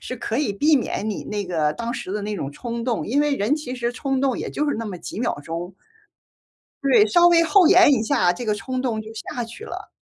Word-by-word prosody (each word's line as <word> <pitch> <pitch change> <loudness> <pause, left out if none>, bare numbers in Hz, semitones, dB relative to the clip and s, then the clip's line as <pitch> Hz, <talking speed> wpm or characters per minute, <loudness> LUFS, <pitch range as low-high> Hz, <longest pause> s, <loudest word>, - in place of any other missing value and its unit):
是 255 - -6
可 225 +2 -3
以 240 -10 0
避 300 +9 +3
免 220 -4 -1
你 - - -5
那 205 -1 -3
个 160 -4 0
当 235 0 -4
时 190 - -5
的 210 - -3
那 210 +1 -3
种 140 -8 -4
冲 235 - -5
动， 235 -2 -2
因 275 +7 +1
为 295 -1 +1
人 215 +7 +1
其 265 -5 -5
实 240 -1 -2
冲 270 0 -2
动 270 -3 +1
也 - - -4
就 300 - -1
是 - - -1
那 230 - -4
么 195 -4 -5
几 200 - -7
秒 240 - -1
钟。 170 +3 -5 1.1
对， 240 -6 +5
稍 345 +10 +5
微 335 -1 +5
后 360 +1 +5
延 360 -4 +7
一 225 - +2
下， 175 -5 +2
这 235 - -6
个 210 -1 +1
冲 255 +5 -4
动 235 -4 -1
就 220 0 -9
下 240 +2 -5
去 235 - -10
了。 - - -8
235 Hz, 270 characters per minute, -22 LUFS, 210-275 Hz, 1.1 s, 延